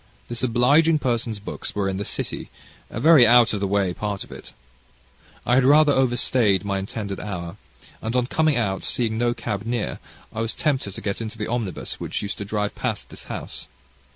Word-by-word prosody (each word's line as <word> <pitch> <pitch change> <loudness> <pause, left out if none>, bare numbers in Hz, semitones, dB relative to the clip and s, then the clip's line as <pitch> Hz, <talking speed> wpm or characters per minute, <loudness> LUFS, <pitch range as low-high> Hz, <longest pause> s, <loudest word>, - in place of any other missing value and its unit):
This 120 -1 -4
obliging 140 +7 +4
person's 120 -5 -1
books 100 - -7
were 100 -1 0
in 95 -1 -2
the 100 - -2
City, - - -4 0.4
a - - -5
very 145 -3 +7
out 120 -1 +6
of 105 - -1
the 100 - 0
way 100 -2 +1
part 100 +1 -3
of - - -16
it. - - -11 0.9
I 125 - +2
had 130 +1 +5
rather 145 +2 +6
out 130 -2 +2
stayed 105 -6 +2
my 100 -1 -1
intended 100 0 -5
hour, 90 -2 -5 0.4
and, 115 +2 -3
on 125 -1 +3
coming 155 +2 +2
out, 95 -5 0
seeing 110 -2 -1
no 120 0 +1
cab 100 -2 -3
near, 115 -1 -2 0.3
I 110 - -3
was 115 0 -3
tempted 130 -10 -1
to - - -7
get 100 +2 -3
into 115 0 -6
the 105 - -3
omnibus 110 -6 -3
which - - -3
used 100 - -4
to 100 - -4
drive 105 0 -2
past - - -3
this - - -9
house. - - -6
115 Hz, 205 wpm, -23 LUFS, 100-125 Hz, 0.9 s, very